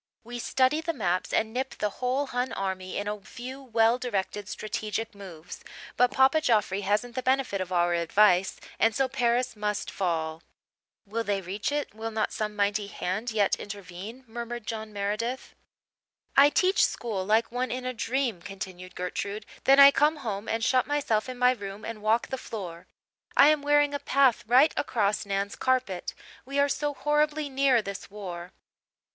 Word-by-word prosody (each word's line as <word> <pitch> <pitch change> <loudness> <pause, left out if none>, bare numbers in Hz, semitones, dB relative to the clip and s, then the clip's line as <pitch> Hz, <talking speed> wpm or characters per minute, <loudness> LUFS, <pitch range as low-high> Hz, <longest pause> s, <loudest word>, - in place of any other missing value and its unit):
"We 240 +1 -7
study 260 +5 +2
the 330 +1 -2
maps 180 -4 -1
and 220 0 0
nip 260 +2 -3
the 210 - -1
whole 255 +3 +1
Hun 250 -1 -2
army 190 -1 -3
in 205 - -3
a 210 0 -3
few 255 +6 -8
well 230 -1 +2
directed 205 -4 -3
strategic 215 +1 -4
moves. 180 -5 -10 0.3
But 250 +1 +4
Papa 265 +5 +4
Joffre 210 -7 +1
hasn't 210 +5 0
the 255 - -2
benefit 260 -6 +1
of 185 0 -5
our 175 -1 +2
advice 180 +2 +3 0.2
and 225 -1 +3
so 270 +1 +2
Paris 245 -2 0
must 210 -1 -2
fall." 165 -4 -2 0.6
"Will 225 +3 -3
they 205 -2 0
reach 195 +6 -3
it 295 -5 -2
will 220 +1 -5
not 220 -1 -1
some 210 -1 -3
mighty 205 0 0
hand 200 +4 -3
yet 210 -3 +2
intervene?" 200 +4 -8
murmured 235 0 -6
John 220 -1 -5
Meredith. 210 +5 -3 0.8
"I 280 +1 +8
teach 375 +6 +3
school 215 -6 -1
like 220 +4 +2
one 250 +1 -1
in 255 +1 -4
a 255 - -2
dream," 240 -4 -1
continued 185 -2 -8
Gertrude; 200 +4 -4 0.2
"then 275 +1 +6
I 280 0 +11
come 300 +3 +3
home 205 0 -3
and 225 0 -1
shut 255 -1 +2
myself 260 -6 0
in 255 - -6
my 250 0 +5
room 205 -3 -6
and 225 -2 -6
walk 220 +2 +1
the 265 - -3
floor. 180 -9 -7 0.5
I 290 - +8
am 305 -1 +3
wearing 290 0 +3
a 285 - -1
path 275 -3 +3
right 260 +7 +5
across 210 -5 0
Nan's 200 0 -2
carpet. 255 -8 -1 0.3
We 275 +2 -5
are 285 0 +4
so 290 0 -1
horribly 295 0 +1
near 265 -4 +3
this 200 -1 -7
war." 180 -3 -7
225 Hz, 175 wpm, -27 LUFS, 200-260 Hz, 0.8 s, I